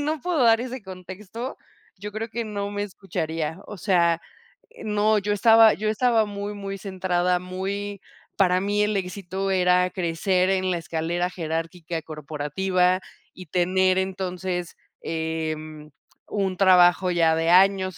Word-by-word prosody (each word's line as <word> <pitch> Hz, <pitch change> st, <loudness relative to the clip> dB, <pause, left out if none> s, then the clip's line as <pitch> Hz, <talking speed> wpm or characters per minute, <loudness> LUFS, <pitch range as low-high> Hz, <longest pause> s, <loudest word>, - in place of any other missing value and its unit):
no 300 Hz, 0 st, -1 dB
puedo 345 Hz, -7 st, +1 dB
dar 225 Hz, 0 st, +5 dB
ese 255 Hz, -2 st, -6 dB
contexto, 190 Hz, +6 st, -8 dB, 0.4 s
yo 210 Hz, +2 st, -6 dB
creo 225 Hz, +2 st, -4 dB
que 235 Hz, 0 st, -3 dB
no 205 Hz, -1 st, -4 dB
me 205 Hz, 0 st, -3 dB
escucharía. 165 Hz, -4 st, -4 dB
O 210 Hz, -, -8 dB
sea, 170 Hz, -3 st, +2 dB, 0.5 s
eh, 480 Hz, -, -13 dB
no, 210 Hz, 0 st, +2 dB
yo 205 Hz, +1 st, -1 dB
estaba 225 Hz, +1 st, +6 dB
yo 215 Hz, +1 st, -1 dB
estaba 230 Hz, 0 st, +2 dB
muy, 205 Hz, 0 st, -5 dB
muy 195 Hz, -1 st, -6 dB
centrada, 180 Hz, -2 st, 0 dB
muy 195 Hz, +2 st, -4 dB, 0.4 s
para 185 Hz, -1 st, +3 dB
mí 205 Hz, +1 st, 0 dB
el 210 Hz, 0 st, +1 dB
éxito 190 Hz, 0 st, -3 dB
era 180 Hz, -1 st, +3 dB
crecer 180 Hz, +2 st, 0 dB
en 185 Hz, -1 st, +1 dB
la 175 Hz, -, -1 dB
escalera 170 Hz, +2 st, -2 dB
jerárquica 165 Hz, 0 st, -4 dB
corporativa, 160 Hz, +5 st, -1 dB, 0.3 s
y 185 Hz, -, -11 dB
tener 185 Hz, +3 st, +2 dB
entonces, 185 Hz, -2 st, -3 dB, 0.3 s
em, 155 Hz, -1 st, -4 dB, 0.4 s
un 195 Hz, -3 st, -1 dB
trabajo 180 Hz, -1 st, +5 dB
ya 165 Hz, -2 st, +3 dB
de 165 Hz, +1 st, +1 dB
años. 185 Hz, 0 st, +4 dB
185 Hz, 145 wpm, -24 LUFS, 175-205 Hz, 0.5 s, estaba